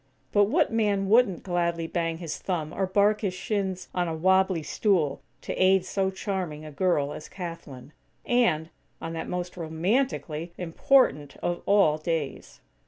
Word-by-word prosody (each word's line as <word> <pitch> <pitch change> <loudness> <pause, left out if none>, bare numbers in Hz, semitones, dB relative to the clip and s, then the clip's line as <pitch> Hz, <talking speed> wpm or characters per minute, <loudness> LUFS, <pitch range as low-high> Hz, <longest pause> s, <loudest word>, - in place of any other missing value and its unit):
But 205 0 +5
what 215 - +1
man 205 -3 +1
wouldn't 220 -5 +4
gladly 170 -2 -1
bang 165 0 -2
his 165 -3 -5
thumb, 165 -4 -3
or 190 0 -1
bark 205 +2 +3
his 190 -4 -2
shins 190 -3 -2
on 180 -1 0
a 165 - -2
wobbly 190 0 +2
stool, 165 -7 +1 0.2
to - - -4
aid 190 0 +4
so 190 0 0
charming 185 -6 -4
a 155 - -8
girl 145 -2 +1
as - - -9
Kathlyn? 165 -7 -8 0.3
And, 180 -11 +2 0.3
on 165 0 -5
that 165 - -5
most 180 0 -4
romantically 170 - -1
important 165 - +2
of 175 0 -1
all 195 -7 +4
days!! 155 -3 -4
180 Hz, 155 wpm, -27 LUFS, 160-195 Hz, 0.3 s, But